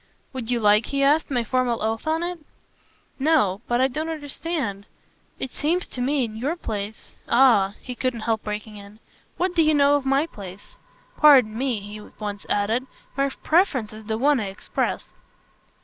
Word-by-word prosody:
"Would 250 -3 -5
you 245 -1 +1
like," 210 0 +4
he 275 0 0
asked, 295 +3 +3
"my 245 -4 0
formal 245 -1 0
oath 225 +5 -2
on 320 +2 +1
it?" 350 0 -4 0.8
"No 265 - +2
but 240 0 +1
I 260 - +4
don't 310 +5 -4
understand. 290 - -4 0.5
It 265 - -4
seems 340 +4 0
to 250 - -5
me 275 +1 +1
in 215 -1 -8
your 280 +9 -1
place 215 - -6
!" - - -34
"Ah," 230 -6 +4
he 250 - -6
couldn't 245 -2 -2
help 220 0 -1
breaking 210 0 -5
in, 200 +1 -13 0.4
"what 365 0 0
do 340 - +3
you 310 -1 +3
know 285 0 +5
of 285 - -5
my 275 +3 +3
place? 200 - -11 0.4
Pardon 260 -8 +6
me," 245 -3 -1
he 205 +1 -9
at 210 - -15
once 205 -1 -5
added; 220 +6 0 0.3
"my 275 +1 +1
preference 275 - +1
is 215 0 -11
the 220 0 -2
one 280 +3 +3
I 215 - -2
express." 195 0 -3
250 Hz, 185 wpm, -24 LUFS, 215-290 Hz, 0.8 s, Pardon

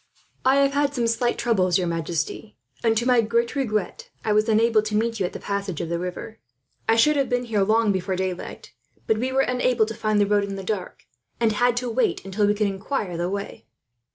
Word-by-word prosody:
"I 260 +1 +4
have 275 0 +3
had 285 0 +1
some 240 -2 0
slight 235 +1 0
troubles, 190 -7 +2
your 185 - 0
majesty; 165 +5 -3 0.3
and 225 -1 +3
to 235 - 0
my 250 -2 +4
great 235 +3 0
regret, 270 - -2 0.2
I 215 - +2
was 215 +2 +2
unable 220 0 +4
to 210 0 -3
meet 225 +1 0
you 185 - +1
at - - -11
the - - -6
passage 200 -4 -3
of 170 - -3
the 170 0 -1
river. 180 +5 -6 0.5
I 225 - +5
should 300 +7 +4
have 275 - +1
been 245 -1 0
here 215 -4 0
long 215 +2 +3
before 190 0 -1
daylight, 185 -1 -5 0.3
but 220 -1 +1
we 255 +3 -1
were 265 +1 +3
unable 250 -3 +2
to 220 - -5
find 215 -1 0
the 205 - +4
road 205 0 +2
in 200 0 -5
the 195 - -6
dark, 190 -2 -5 0.3
and 230 -2 +3
had 240 +3 +2
to 245 0 -1
wait 250 -3 0
until 200 +2 0
we 205 - +2
could 210 0 +1
inquire 195 -1 -3
the 175 +1 -2
way." 200 +1 -6
215 Hz, 230 wpm, -24 LUFS, 195-240 Hz, 0.5 s, I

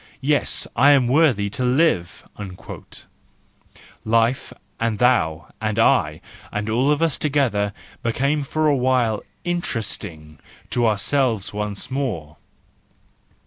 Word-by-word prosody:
yes, 145 +2 +1
I 140 +5 +6
am 130 -4 +3
worthy 130 -7 +3
to 125 - -3
live! 125 - +1 1.8
"—life, 115 +3 +1 0.3
and 115 -2 0
thou, 85 -11 +2
and 110 -1 -1
I, 95 - +3 0.3
and 105 +1 -3
all 125 +5 +2
of 150 +2 +2
us 165 -3 0
together 130 -9 +1 0.3
became 140 +6 0
for 155 +3 -1
a 150 -2 +4
while 125 -4 +1 0.2
interest¬ 170 - -2
ing 75 -2 -10 0.3
to 120 -1 +2
ourselves 110 0 0
once 105 +3 -4
more. 105 - -3
120 Hz, 115 wpm, -22 LUFS, 105-140 Hz, 1.8 s, I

